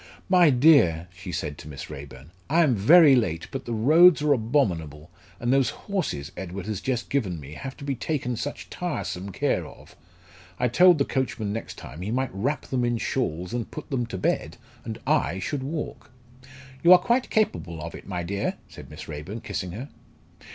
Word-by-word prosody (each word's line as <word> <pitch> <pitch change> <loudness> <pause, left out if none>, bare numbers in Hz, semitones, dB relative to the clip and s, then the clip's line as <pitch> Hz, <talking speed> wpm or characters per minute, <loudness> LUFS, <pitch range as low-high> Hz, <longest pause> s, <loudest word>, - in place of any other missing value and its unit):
"My 180 -3 +6
dear!" 125 - +5
she 95 0 -8
said 75 -3 -4
to - - -10
Miss 70 -3 -8
Raeburn, 70 +2 -10 0.2
"I 165 +4 +4
am 140 -5 +3
very 140 - +7
late, 85 -9 0
but 135 -1 -5
the 120 - -5
roads 155 +9 +6
are 150 -1 +4
abominable, 90 - -1 0.3
and 120 +2 +1
those 135 -2 +3 0.2
horses 175 - -2
Edward 95 0 -6
has 105 -3 -4
just 125 -3 -2
given 100 - -1
me 70 0 -10
have 135 - -7
to - - -10
be 140 -1 -1
taken 125 -1 -2
such 140 +6 -6
tiresome 100 - -4
care - - 0
of. - - -15 0.6
I 125 - +2
told 175 +7 +6
the 140 - +1
coachman 115 -6 -2
next 115 - -6
time 80 - -9
he 95 - -4
might 130 0 -1
wrap 130 +10 -1
them 130 -2 -1
in 120 -1 +1
shawls 90 -8 -2
and 120 -2 -3
put 155 - -9
them 120 -3 -1
to 95 - -5
bed, - - -1 0.3
and 110 0 -6
I 85 - +1
should 130 +9 -3
walk." 135 -4 -5 0.7
"You 175 +2 +8
are - - +10
quite 240 +8 0
capable 90 - 0
of 85 +2 -6
it, - - -11
my 90 -3 -3
dear," 100 +3 -2
said - - -12
Miss - - -10
Raeburn, 80 +9 -6
kissing 90 -2 -4
her. 125 +8 -7
115 Hz, 195 wpm, -25 LUFS, 90-140 Hz, 0.7 s, are